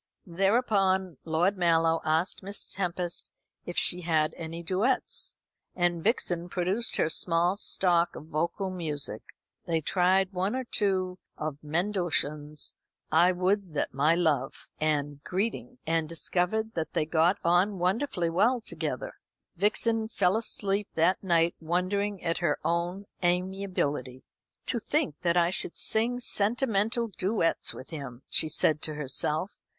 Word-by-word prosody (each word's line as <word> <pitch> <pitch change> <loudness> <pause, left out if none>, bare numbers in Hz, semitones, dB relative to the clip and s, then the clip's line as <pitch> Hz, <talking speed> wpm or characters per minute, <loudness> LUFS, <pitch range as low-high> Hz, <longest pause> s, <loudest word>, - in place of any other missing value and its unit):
Thereupon 190 - +1
Lord 170 +5 +1
Mallow 165 -1 +3
asked 160 +4 0
Miss 200 +1 -2
Tempest 175 -2 -3 0.4
if 175 - -6
she 180 - +4
had 160 -3 +1
any 165 +1 -6
duets, 200 +9 +1 0.4
and 175 -2 0
Vixen 175 -6 0
produced 185 +6 0
her - - +2
small 170 +3 +2
stock 175 -4 +1
of - - -9
vocal 170 +5 -2
music. 155 -6 0 0.5
They 165 -1 +1
tried 185 +4 +2
one 190 +5 -1
or 260 - -2
two 190 -5 -1 0.2
of 155 -1 -5
Mendelssohn's, 155 -3 -1 0.4
"I 170 +4 +5
would 185 -1 0
that - - -1
my 150 +5 +3
love," 150 -6 -1
and 145 -2 -1
"Greeting," 230 +6 -3
and 165 -1 0
discovered 185 +6 0
that 160 -2 -3
they 155 - +1
got 165 +4 +2
on 180 +4 +3
wonderfully 180 -1 0
well 230 +9 +3
together. - - -4 0.4
Vixen 220 +4 +1
fell 185 -3 +1
asleep 205 -2 -1
that 170 +5 +2
night 170 -2 +2
wondering 185 +4 -1
at 165 0 0
her 175 - +1
own 175 +4 -1 0.2
amiability. 180 -7 -1 0.4
"To - - -1
think 150 - -1
that 175 -1 +1
I 170 0 +3
should 180 - -1
sing 235 +3 +3
sentimental 225 0 +1
duets 190 -3 0
with 130 - -10
him," 135 -5 -7
she 155 - +3
said 155 0 +2
to 155 - -2
herself. 150 +5 -1
175 Hz, 135 wpm, -28 LUFS, 160-200 Hz, 0.5 s, I